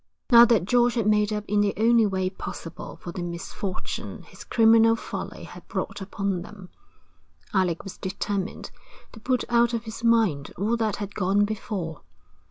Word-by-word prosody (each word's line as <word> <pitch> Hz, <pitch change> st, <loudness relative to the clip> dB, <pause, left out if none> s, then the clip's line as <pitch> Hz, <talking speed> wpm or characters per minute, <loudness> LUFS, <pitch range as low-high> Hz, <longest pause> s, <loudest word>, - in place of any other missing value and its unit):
Now 235 Hz, 0 st, +10 dB
that 225 Hz, -7 st, +3 dB
George 240 Hz, +2 st, +3 dB
had 230 Hz, -4 st, 0 dB
made 210 Hz, 0 st, +3 dB
up 210 Hz, -1 st, -2 dB
in 210 Hz, 0 st, +2 dB
the 205 Hz, -1 st, +1 dB
only 225 Hz, 0 st, +4 dB
way 190 Hz, -1 st, -1 dB
possible 165 Hz, -3 st, -8 dB
for 175 Hz, -, -5 dB
the 180 Hz, -, -6 dB
misfortune 175 Hz, +2 st, -5 dB
his -, -, -13 dB
criminal 225 Hz, 0 st, +5 dB
folly -, -, -6 dB
had -, -, -12 dB
brought -, -, -4 dB
upon 195 Hz, -2 st, -2 dB
them, 190 Hz, 0 st, -11 dB, 0.8 s
Alec 185 Hz, -4 st, +1 dB
was 195 Hz, -, -9 dB
determined 195 Hz, +1 st, -4 dB, 0.4 s
to 225 Hz, -, -12 dB
put 255 Hz, +3 st, 0 dB
out 235 Hz, 0 st, +3 dB
of 230 Hz, -, -3 dB
his 225 Hz, 0 st, -8 dB
mind 220 Hz, -12 st, +2 dB
all 215 Hz, +5 st, +1 dB
that 220 Hz, -3 st, 0 dB
had 205 Hz, 0 st, -6 dB
gone 200 Hz, +2 st, +2 dB
before. 195 Hz, -6 st, -4 dB
210 Hz, 170 wpm, -25 LUFS, 190-230 Hz, 0.8 s, Now